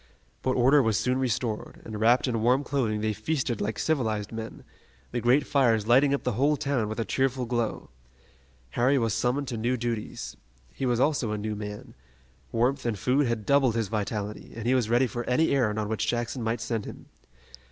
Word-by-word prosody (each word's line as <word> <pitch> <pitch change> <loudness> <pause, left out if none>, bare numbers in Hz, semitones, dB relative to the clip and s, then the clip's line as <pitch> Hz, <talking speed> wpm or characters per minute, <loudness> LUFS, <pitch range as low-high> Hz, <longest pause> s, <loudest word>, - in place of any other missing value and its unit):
But 130 - +1
order 130 +4 +5
was 110 -4 +1
soon 130 +1 0
restored, 120 -3 -2
and 110 -2 -6
wrapped 120 +5 +4
in 115 -3 -1
warm 125 +5 +3
clothing 115 -7 -1
they 110 0 0
feasted 120 +1 -2
like 105 +1 -2
civilized 110 -9 -1
men, 115 0 -7 0.5
the 120 - -2
great 130 +5 +3
fires 120 -6 +2
lighting 130 +5 +5
up 140 - 0
the 125 - 0
whole 140 +7 +2
town 140 -7 -1
with 110 - -4
a 115 - 0
cheerful 130 +3 0
glow. 120 - -2 0.8
Harry 130 - +2
was 115 -4 +1
summoned 125 +5 0
to 120 - -3
new 120 +3 0
duties. 115 -2 -4 0.4
He 135 - -2
was 120 -1 +1
also 135 -5 +1
a - - -2
new 105 +1 -3
man. 105 0 -7 0.6
Warmth 125 +4 +1
and 115 -3 -1
food 130 +6 +2
had 115 -3 -2
doubled 135 -4 +3
his 110 -4 -1
vitality, 105 -1 -4
and 115 -1 -6
he 125 - +3
was 125 -4 +1
ready 120 +3 +4
for 120 0 -4
any 155 +6 +2
errand 115 -6 +1
on 105 -1 -1
which 110 0 -1
Jackson 120 +1 -2
might 115 0 -1
send 115 -2 -2
him. - - -9
120 Hz, 200 wpm, -27 LUFS, 110-130 Hz, 0.8 s, order